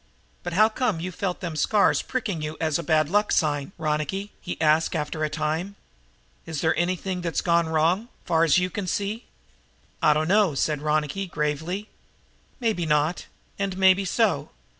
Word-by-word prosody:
"But 175 - -5
how 215 +5 +6
come 220 -5 -1
you 180 +3 -4
felt 180 +1 -3
them 170 -4 -4
scars 200 +7 +3
pricking 215 -11 -3 0.2
as 160 0 0
a - - -4
bad 155 -3 +2
luck 205 +5 +1
sign, 145 0 +1
Ronicky?" 160 +6 -2
he - - -6
asked 155 +2 +3
after 155 0 -2
a 155 - 0
time. 160 +6 -2 0.7
"Is 160 -3 -3
there 160 - +2
anything 180 +1 -1
that's 170 -2 -1
gone 170 -2 +2
wrong, 165 +8 +1 0.2
far 165 0 +3
as 165 0 +4
you 180 0 0 0.2
see?" 205 +5 -2 0.8
"I 150 - +5
dunno," 170 +2 +3
said 150 +1 0
Ronicky 155 +5 -1
gravely. 160 +6 -2 0.7
"Maybe 215 -9 0
not, 150 +3 +1 0.3
and 195 -2 -2
maybe 190 0 +5
so. 200 0 +1
170 Hz, 160 wpm, -25 LUFS, 155-195 Hz, 0.8 s, how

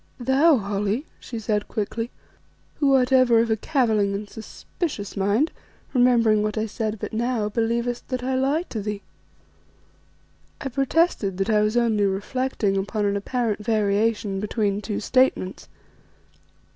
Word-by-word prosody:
"Thou, 270 +5 +4
Holly," 205 +5 -2
she 235 - -7
said 210 -1 -1
quickly, 225 +2 -3 0.7
"who 275 -2 +3
art 255 0 +2
ever 255 -3 +5
of 230 0 +1
a - - +4
cavilling 220 -6 +1
and 205 +1 -5
suspicious 220 - -6
mind, 205 +10 +1 0.4
remembering 235 -4 +4
what 210 +1 -2
I 215 - 0
said 220 0 -3
but - - -5
now, 230 -2 0
believest 235 +2 -1
that 255 -1 -3
I 260 +1 -1
lie 275 +5 +1
to 220 - -4
thee." 205 0 -4 1.6
I 270 - -4
protested 270 - +1
that 195 +3 0
I 210 -1 +4
was 215 +3 +1
only 220 -4 +2
reflecting 205 +1 -1
upon 205 +2 -1
an 200 0 +1
apparent 215 0 -2
variation 210 -1 +1
between 205 -1 -1
two 210 -1 -3
statements. 255 -6 +1
220 Hz, 145 wpm, -24 LUFS, 205-250 Hz, 1.6 s, ever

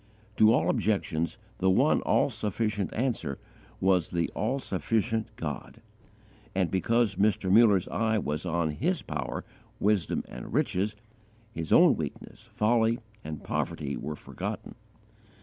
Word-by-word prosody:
To 110 0 +7
all 120 - +3
objections 95 -5 0 0.2
the 95 - +3
one 95 - +4
all - - +2
sufficient 105 -3 -2
answer 110 - -1 0.4
was 95 -3 +2
the 85 -1 -1
all 125 +5 0
sufficient 110 0 -1
God; 75 -2 -6 0.8
and, 90 -4 +1
because 115 +2 +1
Mr. 100 -2 +2
Muller's 105 -3 +5
eye 110 -1 +1
was 75 -6 -2
on 85 -2 0
His 160 - -1
power, - - -4 0.3
wisdom, 100 -4 +1
and - - -8
riches, 105 -6 0 0.6
his 80 -5 -5
own - - +7
weakness, - - -6
folly, 115 +1 +1 0.3
and 75 -1 -6
poverty - - -2
were 75 - -4
forgotten. - - -6
100 Hz, 130 wpm, -28 LUFS, 85-115 Hz, 0.8 s, To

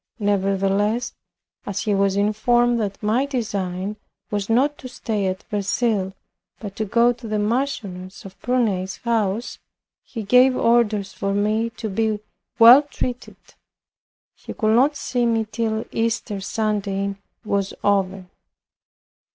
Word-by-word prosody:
Nevertheless, 200 +2 0 0.5
as 200 -1 -2
he 210 - 0
was 195 0 +2
informed 235 +4 +2
that 205 -1 -4
my 235 +6 +1
design 205 -6 -3 0.3
was 205 -1 -2
not 270 +6 +3
to 260 - -8
stay 215 -5 -2
at 185 0 -3
Verceil, 205 -1 0 0.5
but 205 -3 -7
to 220 - -1
go 235 +4 +3
to 240 -1 -10
the 215 0 -1
Marchioness 205 -5 -3
of 195 0 -10
Prunai's 205 -7 0
house, 225 -1 -1 0.4
he 225 -4 -7
gave 250 +5 +5
orders 215 -4 +2
for 195 0 -2
me 215 +3 +1
to 220 - -4
be 215 +1 0 0.4
well 235 +4 +9
treated. 255 -4 -5 1.0
He - - -10
could 215 -1 +2
not 275 +5 +4
see 245 -4 -1
me 225 -1 +1
till 220 -1 -1
Easter 225 -3 -2
Sunday 200 -1 -1 0.3
was 200 -2 -1
over. 195 -2 +1
215 Hz, 130 wpm, -22 LUFS, 195-235 Hz, 1.0 s, well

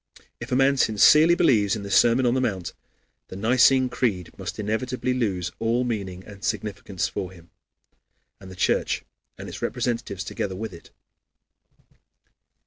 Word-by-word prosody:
If 120 +3 -8
a - - +2
man 135 +1 +3
sincerely 150 +9 +5
believes 110 - +3
in 105 - -6
the 100 - -7
Sermon 120 +4 +4
on 120 - +3
the 130 - +1
Mount, 95 -8 -2 0.5
the - - -9
Nicene 125 +5 +4
Creed 105 -8 -2
must - - -6
inevitably 125 +4 -2
lose 100 -8 -1
all 115 +2 +1
meaning 100 -6 -4
and 100 -1 -13
significance 105 -3 -3
for 95 -3 -5
him, 85 -2 -17 0.9
and 95 - -12
the 95 - -10
Church 90 - 0 0.3
and - - -8
its - - -8
representatives 115 -6 -2
together 95 +2 -4
with 110 0 -6
it. 85 - -13
110 Hz, 150 wpm, -24 LUFS, 95-125 Hz, 0.9 s, sincerely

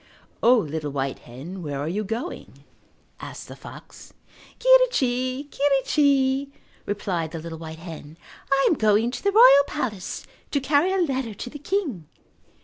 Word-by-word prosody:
"O, 245 +2 +6
little 155 -6 -3
white 135 -1 -3
hen, 150 +11 -9
where 145 -4 -4
are 145 - -3
you 200 +6 -2
going?" 230 - -6 0.6
asked - - -8
the - - -10
fox. - - -13 0.4
"Quirrichi, 280 - +3
quirrichi," 275 -1 +2 0.4
replied 185 -5 -2
the 165 - -7
little 165 0 -8
white 160 -1 -8
hen, 160 -2 -10 0.3
"I 275 0 +4
am - - +4
going 220 -2 +2
to - - -7
the 400 - +2
royal 420 - +8
palace 225 -11 -4 0.2
to 285 - 0
carry 285 +6 +2
a 385 - +1
letter 265 - -1
to 245 - -6
the 295 - -8
king." 295 - -2
245 Hz, 150 wpm, -24 LUFS, -, 0.6 s, royal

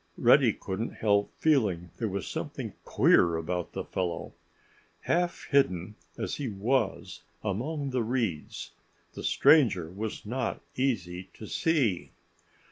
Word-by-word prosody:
Reddy - - +6
couldn't 100 +5 -4
help 100 -2 +2
feeling 105 - +2
there 115 - -1
was 95 -2 -4
something - - -5
queer 85 -1 +4
about 85 +2 -3
the - - -3
fellow. 90 -3 -3 0.7
Half 175 +1 0
hidden 95 - +2 0.2
as - - -3
he 145 - -3
was 110 +2 -1 0.2
among 135 +8 -2
the 125 -1 +1
reeds 110 -9 -2 0.4
the - - -7
stranger 95 - +4
was 105 +3 -5
not 120 +2 -2 0.2
easy 95 -9 -1
to 110 - -9
see. 125 - 0
105 Hz, 125 wpm, -29 LUFS, 90-130 Hz, 0.7 s, Reddy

